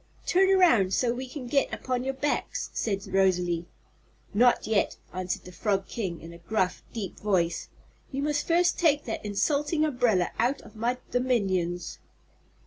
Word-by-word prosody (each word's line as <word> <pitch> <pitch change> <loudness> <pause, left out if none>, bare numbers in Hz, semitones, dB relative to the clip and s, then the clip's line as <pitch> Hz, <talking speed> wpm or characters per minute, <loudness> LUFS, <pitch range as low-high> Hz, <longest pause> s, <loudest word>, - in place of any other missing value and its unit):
"Turn 380 +1 +4
around, 285 - +5
so 240 -2 +2
we 255 +1 -6
can 265 -1 -7
get 275 +3 +1
upon 250 -1 -2
your 270 +1 -2
backs," 290 +2 -2
said 195 -3 -2
Rosalie. 180 -3 +1 0.7
"Not 240 +4 +4
yet," 215 -2 +1 0.2
answered 185 0 -3
the 180 - -11
Frog 195 0 -1
King, 190 -8 -4
in 165 +1 -10
a 170 - -12
gruff, 185 +1 -1
deep 205 -6 -5
voice. 180 -5 0 0.4
"You 275 0 -2
must 295 0 0
first 350 +1 +3
take 300 -4 +3
that 225 - -4
insulting 290 +9 +1
umbrella 245 - +2
out 250 +5 +2
of 215 - -15
my 235 +3 0
dominions." 195 -9 0
230 Hz, 155 wpm, -27 LUFS, 190-275 Hz, 0.7 s, around